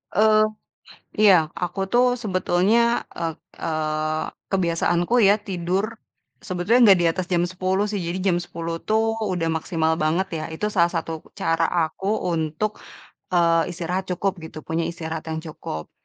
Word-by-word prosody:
eee, 215 +1 +5 0.8
iya 205 -3 +8 0.2
aku 180 +2 -4
tuh 245 +1 +4
sebetulnya, 215 +2 +2
eee 165 -2 -3 0.2
eee, 155 -1 -1 0.3
kebiasaanku 175 +4 +2
ya, 205 - +6
tidur. 190 -1 -2 0.6
Sebetulnya, 185 +7 +1
nggak 190 - +7
di 175 - +2
atas 175 +2 0
jam 175 -1 +2
10.00 185 +2 -1
sih, 205 -1 -3
jadi 170 +2 -3
jam - - +2
10.00 165 -1 -5
tuh 220 +1 +1
udah 180 -5 -1
maksimal 160 0 0
banget, 160 +5 +1 0.2
ya. - - -4
Itu, 160 +6 -3
salah 170 -2 +4
satu 165 -2 -4 0.2
cara 165 0 +1 0.2
aku, 190 +5 -6 0.3
untuk, 160 +7 -2 0.5
eee, 170 -1 +3
istirahat 180 +2 -2
cukup 190 0 -1
gitu, 160 -1 -10
punya 165 +1 -2
istirahat 160 -1 -5
yang 160 0 -3
cukup. 80 - -7
175 Hz, 145 wpm, -23 LUFS, 165-195 Hz, 0.8 s, iya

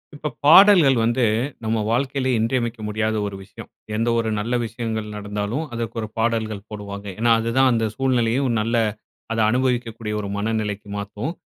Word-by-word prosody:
இப்ப 150 +1 -4 0.2
பாடல்கள் 170 -3 +8
வந்து 120 +2 +1 0.4
நம்ம 110 +1 0
வாழ்க்கையில 135 +2 0
இன்றியமைக்க 115 0 -1
முடியாத 110 +1 -1
ஒரு 100 - -6
விஷயம். - - -12 0.3
எந்த 115 +2 0
ஒரு 115 -1 0
நல்ல 115 +4 -1
விஷயங்கள் 110 -1 -4
நடந்தாலும் 105 +7 -3
அதற்கு 115 -1 -4
ஒரு 110 - -4
பாடல்கள் 110 -3 -1
போடுவாங்க. 100 -1 -7
ஏன்னா 115 +1 +3
அதுதான் 125 +4 +2
அந்த 115 -2 +1
சூழ்நிலையும் 130 0 +1
நல்ல, 115 +2 0 0.6
அதை 115 0 0
அனுபவிக்கக்கூடிய 120 -3 -1
ஒரு 100 - -5
மனநிலைக்கு 105 -1 -2
மாத்தும். 105 +9 -4
115 Hz, 145 wpm, -22 LUFS, 105-125 Hz, 0.6 s, பாடல்கள்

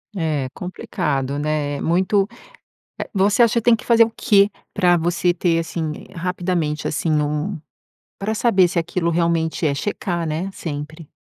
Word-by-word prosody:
É 155 -7 -1
complicado, 140 -6 -3
né? 145 -1 -1
Muito 190 +4 +2 0.7
eh, - - -4
você 200 +4 +3
acha 230 -2 +4
que - - -15
tem 235 -1 +6
que - - -12
fazer 230 -1 +6
o 225 - -4
que 205 -2 +3 0.2
pra 180 -3 +4
você 175 +1 +1
ter, 170 -1 +1
assim, 165 -1 -3 0.2
eh, - - -17
rapidamente, 175 -3 -1
assim, 155 +1 -1
um 150 +4 -1 0.6
pra 215 +3 -2
saber 200 -5 +4
se 170 - 0
aquilo 170 +1 -1
realmente 165 -1 0
é 140 - +1
checar, 175 0 -2
né? 160 +5 -2
Sempre. 155 0 -6
170 Hz, 160 wpm, -21 LUFS, 155-190 Hz, 0.7 s, tem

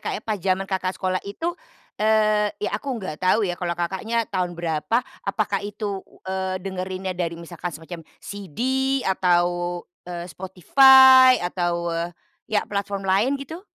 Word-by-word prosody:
Kak, - - -3
ya, - - -7
pas 215 -2 -2
zaman 190 +1 0
Kakak 190 -1 -2
sekolah 185 -1 -1
itu, 330 +12 -3 0.5
eee, 215 -1 +3
ya 210 - -3
aku 270 -3 -3
nggak 185 -8 -6
tahu 185 +4 +3
ya 180 - -1
kalau 175 -1 -3
Kakaknya 205 +7 -1
tahun 180 -2 -1
berapa, 170 +9 -1 0.2
apakah 200 -1 0
itu, 205 -1 -4 0.2
eee, 190 0 -2
dengerinnya 185 0 -4
dari 170 -2 -3
misalkan 170 +1 -6
semacam 165 +1 -9 0.2
CD 200 -5 -9 0.4
atau, 175 -1 +1 0.2
eee, 175 -1 -5
Spotify 260 - +7
atau 175 -1 -1 0.6
ya 210 -1 +1
platform 200 -1 -3
lain 205 +9 +2
gitu? 320 +8 -9
190 Hz, 145 wpm, -23 LUFS, 175-215 Hz, 0.6 s, Spotify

